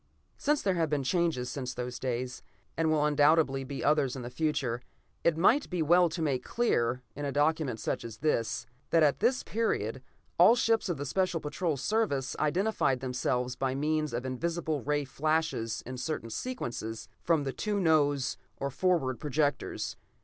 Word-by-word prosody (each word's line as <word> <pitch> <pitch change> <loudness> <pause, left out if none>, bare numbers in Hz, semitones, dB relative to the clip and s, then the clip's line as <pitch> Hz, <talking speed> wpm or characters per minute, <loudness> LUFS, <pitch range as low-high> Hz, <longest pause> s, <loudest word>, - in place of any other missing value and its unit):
Since 295 0 0
there 195 - +2
have 165 -3 0
been 145 -2 0
changes 160 -3 +1
since 125 -1 -4
those 125 0 -4
days, 125 0 -3 0.3
and 165 0 +1
will 155 -1 +3
undoubtedly 145 -2 +3
be 135 +1 -5
others 145 -3 +2
in 130 - -6
the 120 - -6
future, 130 -4 -1 0.4
it 170 -2 +3
might 240 - +4
be 180 -3 0
well 175 +3 +5
to 165 0 -3
make 135 -5 0
clear, 125 - 0
in 145 - -5
a 140 - -1
document 145 -4 +1
such - - -2
is 115 -2 -8
this, 115 -6 0 0.2
that 165 -1 +4
at 145 -2 +3
this 245 +4 +2
period, 135 - -1 0.4
all 215 +7 +8
ships 225 -4 +2
of 175 - -1
the 145 - -4
Special 185 +3 0
Patrol 155 +1 -2
Service 140 - 0
identified 155 -4 +1
themselves 125 -1 -1
by 135 -1 -1
means 155 +1 0
of 120 +2 -3
invisible 160 +3 -2
rays 145 -1 -1
flashed 155 +4 +1
in 115 +3 -4
certain 125 -4 -3
sequences, 120 - -4
from 165 -3 +2
the 135 -1 -3
two 210 -1 -1
nose, 145 -6 +2 0.2
or 140 0 -3
forward, 150 -5 +1
projectors. 145 -1 -1
150 Hz, 170 wpm, -30 LUFS, 130-165 Hz, 0.4 s, all